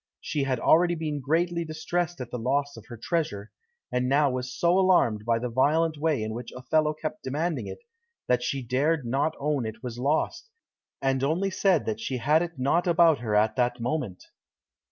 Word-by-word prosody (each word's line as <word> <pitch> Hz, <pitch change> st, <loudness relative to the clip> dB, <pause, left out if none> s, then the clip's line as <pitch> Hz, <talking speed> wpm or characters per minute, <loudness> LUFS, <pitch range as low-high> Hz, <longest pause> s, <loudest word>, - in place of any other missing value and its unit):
She 145 Hz, -2 st, -2 dB
had 130 Hz, -3 st, -1 dB
already 175 Hz, +2 st, +4 dB
been 155 Hz, -3 st, -3 dB
greatly 170 Hz, +5 st, 0 dB
distressed 165 Hz, +1 st, -3 dB
at 120 Hz, -1 st, -7 dB
the 125 Hz, -, -4 dB
loss 140 Hz, +4 st, 0 dB
of -, -, -13 dB
her 120 Hz, -3 st, -9 dB
treasure, 110 Hz, -, -2 dB, 0.4 s
and 125 Hz, 0 st, 0 dB
now 140 Hz, 0 st, +3 dB
was 125 Hz, 0 st, -4 dB
so 175 Hz, +2 st, +3 dB
alarmed 120 Hz, -, +3 dB
by 115 Hz, -1 st, +2 dB
the 125 Hz, +2 st, -3 dB
violent 155 Hz, +7 st, +2 dB
way 150 Hz, -5 st, 0 dB
in 110 Hz, 0 st, -4 dB
which 120 Hz, +2 st, -7 dB
Othello 150 Hz, +4 st, +1 dB
kept 155 Hz, +6 st, -5 dB
demanding 155 Hz, +6 st, -2 dB
it, 475 Hz, -, -9 dB, 0.4 s
that 125 Hz, -1 st, +2 dB
she 135 Hz, +2 st, -2 dB
dared 140 Hz, +4 st, 0 dB
not 140 Hz, +6 st, 0 dB
own 145 Hz, -2 st, 0 dB
it 110 Hz, 0 st, -7 dB
was 120 Hz, -1 st, -6 dB
lost, 155 Hz, -, -1 dB, 0.5 s
and 135 Hz, -1 st, +1 dB
only 175 Hz, +7 st, 0 dB
said 165 Hz, -, +1 dB
she 130 Hz, -, -2 dB
had 150 Hz, +6 st, +3 dB
it 175 Hz, -3 st, -4 dB
not 150 Hz, +8 st, +1 dB
about 170 Hz, -3 st, +5 dB
her 110 Hz, -3 st, -2 dB
at 105 Hz, +1 st, +3 dB
that 125 Hz, -1 st, +1 dB
moment. 120 Hz, -, -3 dB
145 Hz, 190 wpm, -26 LUFS, 125-165 Hz, 0.5 s, about